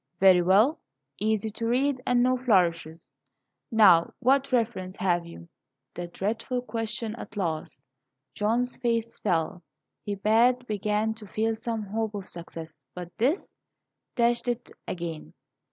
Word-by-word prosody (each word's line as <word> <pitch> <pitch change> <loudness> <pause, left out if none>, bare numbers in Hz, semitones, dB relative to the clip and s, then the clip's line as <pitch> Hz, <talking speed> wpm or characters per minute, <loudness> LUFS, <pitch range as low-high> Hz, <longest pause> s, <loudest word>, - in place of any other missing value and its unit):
"Very 185 -2 +7
well; 210 - +4 0.4
easy 215 +1 0
to 230 +2 -4
read, 260 +2 +1
and 245 -1 +4
no 255 +1 +3
flourishes. 170 -9 +1 0.6
Now, 195 -8 +5
what 270 +2 +2
references 225 -7 -1
have 175 -2 +1
you?" 170 0 -11 0.5
The 175 0 -5
dreadful 225 +7 -3
question 225 -1 -3
at 210 -1 -9
last! 160 -7 -3 0.5
John's 235 +4 0
face 230 -2 -1
fell. 175 -2 0 0.4
He 205 - -3
pad 235 +5 +3
begun 210 0 0
to 220 -2 -12
feel 220 +3 0
some 225 0 -3
hope 215 +1 -3
of 200 -2 -6
success, 165 -2 -8
but 180 0 -8
this 280 - 0 0.6
dashed 240 0 +2
it 240 0 -3 0.2
again. 170 -3 -6
215 Hz, 135 wpm, -27 LUFS, 185-240 Hz, 0.6 s, Very